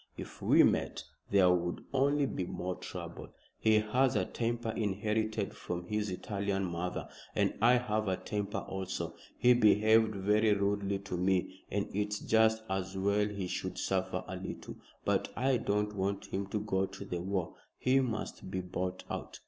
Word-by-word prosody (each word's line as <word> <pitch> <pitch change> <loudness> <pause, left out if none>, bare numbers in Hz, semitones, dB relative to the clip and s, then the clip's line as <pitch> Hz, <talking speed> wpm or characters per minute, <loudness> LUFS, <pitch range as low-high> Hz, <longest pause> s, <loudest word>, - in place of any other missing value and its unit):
If - - -8
we - - +6
met, - - +1 0.3
there 95 -3 +5
would 85 -1 -1
only 140 +2 +3
be 95 -8 -2
more 90 +1 -3
trouble. - - -7 0.3
He 110 -1 +4
has 120 +4 +2
a 95 -3 +2
temper 120 +1 -2
inherited 110 0 -1
from 90 0 -4
his 105 +2 -1
Italian 100 +1 -2
mother, 90 +1 -3 0.3
and - - +2
I 120 +2 +7
have 110 -4 +1
a 95 -1 +1
temper 105 -1 -3
also. 95 -1 -3 0.2
He 125 0 +6
behaved 110 -1 +5
very 105 +2 +3
rudely 100 0 0
to 95 -2 -5
me, 95 0 +1 0.2
and 100 0 -1
it's 105 +1 0
just 110 0 +3
as 95 0 -2
well 100 +2 +2
he 100 -2 -4
should 90 0 -3
suffer 95 0 -1
a - - -5
little. - - -7 0.3
But - - +1
I 130 +1 +2
don't 105 -1 0
want 100 0 -1
him 95 +1 -1
to 105 +2 -2
go 95 -2 0
to 100 - -9
the 90 -2 -3
war. 95 -2 -2 0.2
He 130 +1 +3
must 115 -6 -3
be 95 0 -2
bought 90 0 -3
out." - - -5
100 Hz, 170 wpm, -32 LUFS, 95-110 Hz, 0.3 s, I